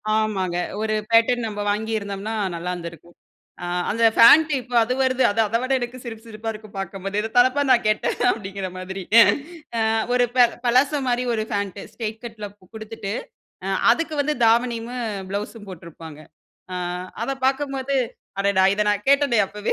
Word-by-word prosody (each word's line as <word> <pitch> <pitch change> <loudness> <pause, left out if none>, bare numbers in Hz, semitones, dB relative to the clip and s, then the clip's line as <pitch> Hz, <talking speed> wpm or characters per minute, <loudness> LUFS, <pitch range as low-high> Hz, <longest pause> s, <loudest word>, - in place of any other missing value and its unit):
ஆமாங்க, 195 -5 0 0.2
1 220 0 -1 0.2
பேட்டர்ன் 230 +1 +4
நம்ப 210 -1 -5
வாங்கியிருந்தோம்னா 210 -1 -3 0.2
நல்லாருந்துருக்கும். 170 -1 -7 0.5
ஆ - - -3 0.2
அந்த 230 +2 +2
பேண்ட் 305 +7 +8
இப்ப 245 0 -11
அது 240 +3 -1
வருது 260 0 +2
அது 225 - -3
அத 215 - -3
விட 255 +1 -1
எனக்கு 245 +1 -5
சிரிப்பு 225 -2 -8
சிரிப்பா 225 0 -6
இருக்கும் 215 -1 -12
பார்க்கும்போது 195 +1 -4
இத 220 +1 -2
தானப்பா 255 +3 +4
நான் 240 - +4
கேட்டேன் 215 0 +1
அப்டிங்கிற 195 -4 -3
மாதிரி 190 +1 -6 0.8
ஆ - - +1 0.3
ஒரு 250 0 +4
ப 245 -1 +7 0.2
பலாசோ 265 +5 +3
மாரி 245 0 0
1 220 -1 -1
பேண்ட் 200 -1 -2
ஸ்ட்ரைட் 220 -1 -5
கட்ல 220 -3 -7 0.3
குடுத்துட்டு 220 -2 -6 0.5
அ - - -2 0.2
அதுக்கு 325 +4 -2
வந்து 300 +1 -1
தாவணியமும் 235 +1 +1 0.2
ப்ளவுஸும் 205 +2 -5
போட்டிருப்பாங்க. 165 -3 -11 0.5
ஆ, - - -3 0.5
அத 235 - -2 0.2
பார்க்கும்போது 275 0 -1 0.4
அடடா! 200 -1 +3
இத 210 - +1
நான் 205 +2 -2
கேட்டேனே 280 -5 +4
அப்போவே 210 +2 -3
220 Hz, 150 wpm, -22 LUFS, 200-245 Hz, 0.8 s, பேண்ட்